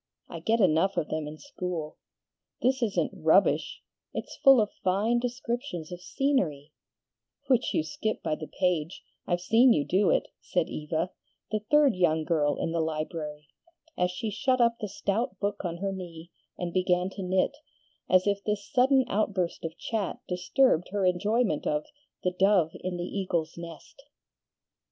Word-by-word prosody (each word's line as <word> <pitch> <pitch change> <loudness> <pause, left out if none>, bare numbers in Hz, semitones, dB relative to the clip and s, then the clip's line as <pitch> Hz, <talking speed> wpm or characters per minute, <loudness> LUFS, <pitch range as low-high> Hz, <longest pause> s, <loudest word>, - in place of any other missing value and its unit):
I - - -7
get 225 +1 +1
enough 190 0 +3
of 155 - 0
them 155 -1 -2
in 150 +1 -8
school. 180 - -5 0.6
This 260 +1 +1
isn't 220 -4 0
'rubbish'! - - +2 0.3
It's - - -5
full 270 -2 +7
of 210 -2 +1
fine 210 +6 +2
descriptions 240 - -4
of 180 0 -7
scenery 180 - -1 0.4
" - - -45
"Which 250 -2 +2
you 320 - +2
skip 220 -9 -3
by - - 0
the 155 0 -5
page, 180 -3 -1 0.2
I've 175 0 0
seen 230 +6 +5
you 145 - +1
do 190 +1 +2
it," - - +1
said 175 -3 -1
Eva, 160 +3 -2 0.4
the 215 - +1
third 295 -4 +5
young 160 -3 +2
girl 150 -3 +1
in 165 - -2
the 165 0 0
library, 155 -2 -4 0.5
as 180 0 +1
she 210 +4 -4
shut 255 +4 +1
up 235 -1 +3
the 210 - -3
stout 220 +6 -2
book 205 0 -2
on 170 -2 -3
her 195 +2 -2
knee 175 -3 -8 0.3
and 175 -1 -4
began 180 0 +1
to 195 - -7
knit 185 +8 +1 0.5
as 185 0 +5
if 200 -1 0
this 210 -1 -2
sudden 260 +1 +4
outburst 195 -4 -1
of 165 -1 -5
chat 220 -5 -2
disturbed 180 - +2
her 200 -1 0
enjoyment 200 0 +1
of 150 0 0 0.4
"The 180 - +1
Dove 185 -3 +3
in 180 -1 -4
the 175 - -3
Eagle's 175 -4 -2
Nest." 170 - -10
185 Hz, 165 wpm, -28 LUFS, 165-225 Hz, 0.6 s, full